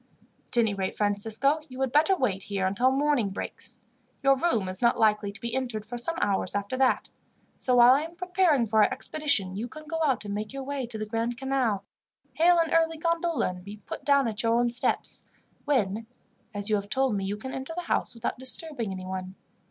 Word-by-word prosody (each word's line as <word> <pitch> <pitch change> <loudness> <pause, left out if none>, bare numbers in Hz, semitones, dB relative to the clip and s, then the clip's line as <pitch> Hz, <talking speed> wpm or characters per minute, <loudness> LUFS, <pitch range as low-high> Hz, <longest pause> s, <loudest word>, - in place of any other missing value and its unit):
"At - - -1
any 225 -3 +3
rate, 190 -1 -3
Francisco, 220 +8 +1
you 255 0 -9
had 265 -2 0
better 315 +7 +4
wait 205 - 0
here 195 -1 -2
until 200 +7 +2
morning 275 -5 +1
breaks. 190 - -7 0.4
Your 275 0 +5
room 255 - 0
is 185 0 -5
not 235 -1 +3
likely 210 -2 +2
to 200 - -11
be 235 +1 -4
entered 240 -5 -2
for 235 +3 -7
some 285 +8 -2
hours 200 -2 0
after 205 +4 -2
that; 260 -1 +2 0.5
so 250 - +2
while 245 +1 +8
I 275 - +2
am 330 +2 -7
preparing 355 -7 +2
for 220 0 +3
our - - +4
expedition, 280 -12 +1
you 220 +4 -3
can 310 +5 -11
go 325 +2 -4
out 265 -8 +1
and 200 - -4
make 210 +3 -4
your 275 0 -5
way 275 -2 -3
to 230 -2 -5
the 215 - -3
Grand 230 +2 -2
Canal, 255 -7 -1 0.5
hail 345 +2 +4
an 330 -1 +1
early 325 0 +2
gondola, 335 - 0
and 180 0 -8
be 205 +2 -9
put 205 - -8
down 280 -3 +4
at 220 0 -1
your 230 0 +2
own 240 0 +2
steps, 240 - +1 0.4
when, 225 -6 0 0.4
as 205 -2 -1
you 215 -1 +2
have 200 0 -6
told 265 -3 +1
me, 195 - -2
you 200 +2 -3
can 260 +5 -7
enter 265 +5 -5
the 355 - -3
house 335 - -1
without 230 - -4
disturbing 260 -4 -2
anyone. 185 0 -6
240 Hz, 215 wpm, -27 LUFS, 205-280 Hz, 0.5 s, while